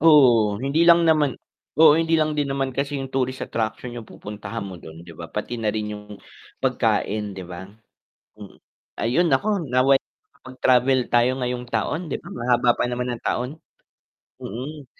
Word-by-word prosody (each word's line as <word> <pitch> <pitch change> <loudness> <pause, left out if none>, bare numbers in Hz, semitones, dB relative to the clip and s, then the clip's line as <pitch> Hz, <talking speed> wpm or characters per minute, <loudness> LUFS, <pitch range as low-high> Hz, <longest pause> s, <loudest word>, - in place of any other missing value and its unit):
Oo, 125 -10 +6
hindi 155 +5 +2
lang 170 0 +7
naman 155 -4 +3 0.4
oo 155 -1 +7
hindi 165 0 +2
lang 155 0 0
din 145 -2 0
naman 135 -1 -1
kasi 140 +2 -2
yung 135 - -5
tourist 130 0 -1
attraction 115 +2 -3
yung 115 - -7
pupuntahan 105 +2 -7
mo 95 -2 -7
dun, 80 +1 -11
'di 85 - -11
ba, 85 0 -7
pati 105 +5 -4
na 110 -2 -1
rin 105 -1 -3
yung 105 - -11 0.6
pagkain 105 -1 0
'di 95 - -6
ba? 90 +1 -7 0.7
Mm, 105 -2 -12 0.4
ayun 145 +10 +2
naku 135 +10 +2 0.2
nawa'y 130 +2 +4
makapag-travel 130 0 0
tayo 120 +1 +4
ngayong 125 -1 -3
taon 115 +8 -1
'di - - -2
ba, - - -11
mahaba 120 0 +2
pa - - +1
naman 125 0 -2
ng - - -11
taon. 125 +1 -1 0.9
Mm, 135 +7 -7
125 Hz, 170 wpm, -23 LUFS, 110-140 Hz, 0.9 s, lang